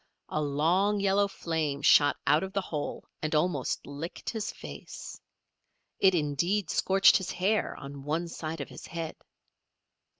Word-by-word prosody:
A 155 - -1
long 170 +8 +2
yellow 200 +1 +3
flame 160 -6 -2
shot 145 -1 +6
out 150 - +4
of 190 0 -5
the 200 - +1
hole 150 -5 -4 0.2
and 155 0 -1
almost 150 -4 0
licked 145 +4 -6
his 220 -3 -3
face. - - -9 0.8
It, 190 -1 +5
indeed, 170 +6 0
scorched 195 +1 +5
his 190 -1 -5
hair 200 +4 0
on 140 0 -8
one 160 +4 -1
side 160 -2 -5
of 140 - -6
his - - -10
head. 165 -1 -5
165 Hz, 145 wpm, -29 LUFS, 150-190 Hz, 0.8 s, shot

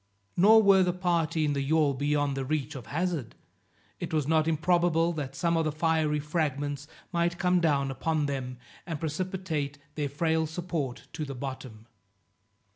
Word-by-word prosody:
Nor 220 +5 +7
were 195 -1 +6
the 180 -1 +2
party 170 -3 +1
in 145 - +1
the 140 - -1
yawl 150 0 +2
beyond 145 +1 0
the 135 - -2
reach 145 +1 -2
of 125 -6 -8
hazard; 160 -4 -2 0.6
it - - -4
was 155 -3 0
not 160 0 +3
improbable 170 +1 +2
that 140 -4 -5
some 170 +2 +1
of 165 - +2
the 155 - 0
fiery 155 -1 +1
fragments 145 -2 -2 0.2
might 170 -1 0
come 180 0 +3
down 140 -4 +2
upon 150 +3 0
them, 130 -3 -3 0.3
and 160 -4 -3
precipitate 160 -3 -3 0.2
their 145 -1 -2
frail 160 +2 +1
support 160 -6 -4
to 155 - -3
the 140 -2 -5
bottom. 130 -4 -7
155 Hz, 165 wpm, -28 LUFS, 140-170 Hz, 0.6 s, Nor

